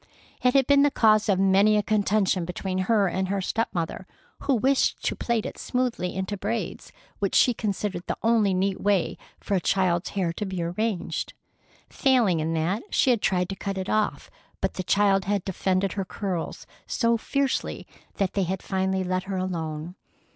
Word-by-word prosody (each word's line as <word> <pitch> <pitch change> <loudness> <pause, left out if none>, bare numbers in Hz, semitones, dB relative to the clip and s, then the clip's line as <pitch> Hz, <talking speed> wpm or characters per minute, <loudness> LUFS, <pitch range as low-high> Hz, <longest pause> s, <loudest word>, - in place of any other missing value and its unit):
It 250 +1 +3
had 270 -1 +5
been 280 +1 +5
the 290 - +5
cause 215 -5 +3
of 195 - +3
many 195 +2 +4
a 210 - +1
contention 200 -3 +1
between 185 +2 -3
her 200 +1 +2
and 190 +1 -1
her 200 +1 -1
step 225 +4 -1
mother, 170 +2 -4 0.3
who 275 - +1
wished 265 +4 +1
to - - 0
plait 235 -3 -1
it - - -6
smoothly 250 -8 -1
into 190 +2 -2
braids, 215 +4 -4 0.3
which 200 -2 -1
she 245 - +5
considered 200 -4 -3
the - - -2
only 225 -3 +3
neat 190 +1 0
way 200 -4 +1 0.2
for - - -4
a 190 - +3
child's 180 -1 +1
hair 180 -4 -1
to 210 - -4
be 185 -2 -3
arranged. 185 +3 -2 0.5
Failing 240 - +2
in 160 +1 -1
that, 170 +7 0
she 260 - +3
had 235 -4 +1
tried 180 -1 +1
to 195 - -3
cut 195 0 -4
it 190 0 -3
off, 215 -1 -1 0.3
but - - -1
the - - -3
child 195 0 +2
had 200 -1 -1
defended 190 0 0
her 195 - -2
curls 185 -2 -4 0.2
so 235 -1 +2
fiercely 275 +4 -1 0.3
that 195 -2 -1
they 200 - 0
had 185 +1 -2
finally 190 0 0
let 185 0 -1
her 195 -1 -3
alone. 165 -3 -3
195 Hz, 185 wpm, -25 LUFS, 185-215 Hz, 0.5 s, had